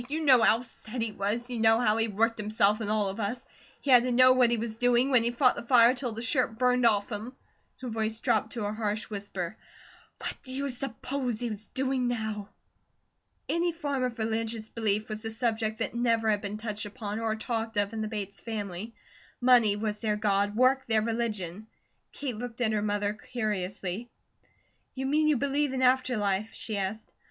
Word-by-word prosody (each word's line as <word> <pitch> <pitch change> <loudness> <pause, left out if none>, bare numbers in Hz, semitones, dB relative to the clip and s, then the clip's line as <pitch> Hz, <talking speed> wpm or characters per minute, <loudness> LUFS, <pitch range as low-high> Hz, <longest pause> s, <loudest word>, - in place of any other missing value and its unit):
You 310 +3 -2
know 255 -4 +7
how 225 +1 +4
SET 240 0 -9
he 225 -1 -1
was, 210 +4 -2
you 240 - -2
know 225 0 +5
how 220 -3 +2
he 225 0 +2
worked 225 +2 0
himself 210 0 +2
and 210 - -2
all 210 -1 +1
of 195 - -6
us 220 +4 -2 0.4
he 280 - 0
had 245 -1 +9
to 250 +1 -1
know 255 +1 +7
what 255 -2 +5
he 235 - +1
was 225 0 -5
doing, 245 +2 +3
when 250 -3 +6
he 235 - +1
fought 250 +1 +4
the - - -5
fire 235 0 +6
till 250 -2 -3
the 225 +1 -6
shirt 240 -2 0
burned 250 0 +3
off 205 0 +1
him" 225 +5 -5 0.5
her 255 - -5
voice 220 -1 -2
dropped 220 -3 +1
to 225 -4 -3
a 205 - -2
harsh 215 0 -3
whisper 200 -2 -4 0.6
"what - - -4
do 260 - -10
you 280 +1 -2
s'pose 250 -1 -3
he's 220 -3 -5
doing 260 -1 0
now?" 220 -4 -3 1.0
Any 340 +1 +1
form 285 -5 -2
of 250 -1 -2
religious 220 0 -2
belief 215 -2 -1
was 215 0 -6
a 225 - -3
subject 220 -1 -1
that - - -2
never 230 -2 +2
had 205 -1 0
been 205 0 -4
touched 215 -1 -5
upon 210 -1 -5
or 225 -1 0
talked 225 -1 -3
of 205 +1 +1
in 220 - -3
the 215 - -2
Bates 205 -2 -5
family. 210 -1 -5 0.4
Money 245 -5 +5
was 210 0 -3
their 215 -2 +1
God, 205 -1 +1
work 260 +3 +3
their 220 -2 +2
religion; 215 -4 -3 0.4
Kate 255 -6 -4
looked 240 +1 -6
at 230 -3 +2
her 215 -1 0
mother 205 0 0
curiously. 210 -1 -4 0.9
"You 265 0 -3
mean 305 +3 +2
you 300 -3 +3
believe 280 +1 0
in 260 0 0
after 255 -1 +3
life?" 205 +1 0
she 220 - -5
asked. 200 +2 -4
225 Hz, 200 wpm, -28 LUFS, 210-245 Hz, 1.0 s, had